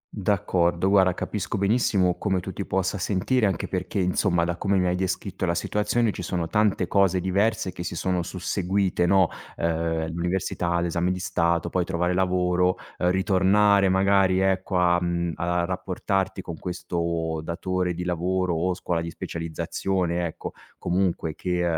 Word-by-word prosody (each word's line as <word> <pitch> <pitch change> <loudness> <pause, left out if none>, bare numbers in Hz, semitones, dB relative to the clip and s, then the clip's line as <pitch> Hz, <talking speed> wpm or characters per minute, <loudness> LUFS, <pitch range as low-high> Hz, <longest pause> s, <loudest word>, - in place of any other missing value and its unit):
D'accordo, 95 -3 +1
guarda 95 -2 +4
capisco 105 0 -3
benissimo 100 -3 +2
come 95 -3 0
tu 95 +1 -6
ti 100 - -4
possa 95 +1 -1
sentire, 105 +5 +1
anche 95 -4 -2
perché, 90 +1 -3
insomma, 90 -1 +2
da 85 0 -2
come 100 0 +1
mi 90 - +2
hai 90 0 +1
descritto 95 +1 -3
la 85 - +1
situazione 105 +5 0
ci 90 - -7
sono 85 -1 -2
tante 100 -1 +1
cose 95 -2 +3
diverse 95 +2 0
che 90 - -8
si 85 - -4
sono 90 0 0
susseguite, 95 0 -1
no? 95 -2 +4 0.3
Ehm, 80 -1 -1
l'università, 85 0 -1
l'esame 85 +1 0
di 90 - -2
Stato, 85 -2 0
poi 90 - +1
trovare 90 +1 -1
lavoro, 90 0 +2 0.2
ritornare 95 +2 +3
magari, 95 0 +3
ecco, 95 0 +1
a, 90 0 +3
mhmm, 85 -1 -1
a 85 0 0
rapportarti 95 +1 -2
con 85 -4 -7
questo 85 -2 -2
datore 90 +1 -2
di 90 - -4
lavoro 90 +1 0
o 90 +3 0
scuola 85 -2 -2
di 85 - -4
specializzazione, 85 +2 -2
ecco, - - -7 0.3
comunque 90 -3 -1
che, 90 +1 -2
90 Hz, 155 wpm, -25 LUFS, 85-95 Hz, 0.3 s, guarda